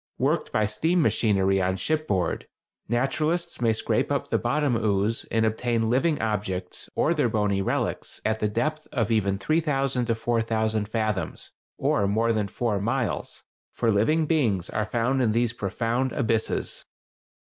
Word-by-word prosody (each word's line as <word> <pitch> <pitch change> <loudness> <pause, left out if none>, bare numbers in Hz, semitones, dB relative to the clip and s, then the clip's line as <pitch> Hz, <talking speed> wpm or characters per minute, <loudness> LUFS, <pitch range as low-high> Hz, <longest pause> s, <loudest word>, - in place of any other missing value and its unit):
worked - - 0
by 110 - +2
steam 160 - +1
machinery 100 - +2
on 95 +1 0
shipboard, 150 - -1 0.4
naturalists 135 +8 0
may 115 -2 +3
scrape 110 - 0
up - - -1
the - - +2
bottom 145 -4 +1
ooze 110 0 0
and 110 0 +2
obtain 115 0 0
living 150 +5 +2
objects 95 -4 -3
or 165 - +2
their 145 -7 +1
bony 105 -3 +1
relics 95 - -2
at 110 0 +1
the 105 - +1
depth 155 +9 -2
of 115 -4 0
even 100 -3 +2
3000 135 0 0
to 115 - +1
4000 110 -2 0
fathoms 110 -3 -2 0.3
or 100 - +1
more 115 +3 +2
than 105 -2 0
four 105 0 -1
miles, 115 -1 -2 0.3
for 115 -2 +2
living 155 +11 +2
beings 115 - +1
are 105 0 -1
found 120 +4 +1
in 110 -4 +2
these 120 0 +1
profound 115 +5 -1
abysses. 110 -1 0
115 Hz, 150 wpm, -26 LUFS, 105-130 Hz, 0.4 s, may